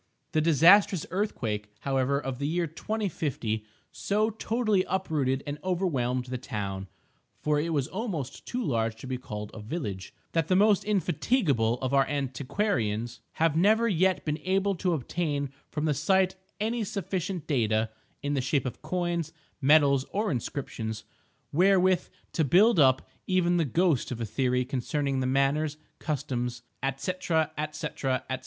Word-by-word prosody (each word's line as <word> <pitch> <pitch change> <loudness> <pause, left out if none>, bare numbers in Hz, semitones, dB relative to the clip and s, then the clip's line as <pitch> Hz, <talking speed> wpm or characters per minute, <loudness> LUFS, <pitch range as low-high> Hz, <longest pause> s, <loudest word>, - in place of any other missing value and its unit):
The 155 - +2
disastrous 170 +4 +5
earthquake, 110 - -2
however, 135 0 +1
of 135 -3 -5
the 140 - -1
year 170 +2 0
2050, 155 - -2 0.3
so 215 +2 0
totally 220 -2 +1
uprooted 150 -8 0
and 145 +1 -4
overwhelmed 140 -10 0
the 125 0 -4
town 100 -5 -4 0.6
(for 150 -1 +2
it 160 +3 -1
was 145 -4 0
almost 185 - -4
too 250 0 -2
large 115 -6 0
to 110 - -11
be 130 -1 -3
called 105 -4 -6
a - - -8
village) 105 - -5 0.2
that 165 -2 +1
the 185 - +3
most 205 +1 +4
indefatigable 170 - +1
of 130 +1 -1
our 135 -1 +4
antiquarians 125 - -1
have 165 -2 +2
never 215 +7 +4
yet 185 -2 +2
been 150 0 -1
able 190 +4 +1
to 180 -1 0
obtain 145 -1 -2 0.2
from 150 0 -2
the 155 - +2
site 185 +6 +2 0.2
any 225 +2 0
sufficient 190 -3 -3
data 110 -5 +1 0.3
(in 145 0 0
the 135 - +1
shape 130 +1 0
of 125 - -5
coins, 170 0 -2 0.3
medals 140 -1 +5
or 210 +1 -1
inscriptions) 110 -4 -4 0.5
wherewith 185 +2 +4 0.2
to 160 - +1
build 190 - +5
up 130 -2 +4 0.2
even 175 -2 +2
the 165 - +2
ghost 160 0 +2
of 120 - -4
a 115 - -1
theory 125 +2 0
concerning 135 +2 -1
the 130 - 0
manners, 140 +3 +1 0.2
customs, 125 -5 -3 0.3
&c., 160 - -1
&c., 160 -2 +2 0.5
&c. 130 -2 +1
150 Hz, 150 wpm, -28 LUFS, 130-185 Hz, 0.6 s, disastrous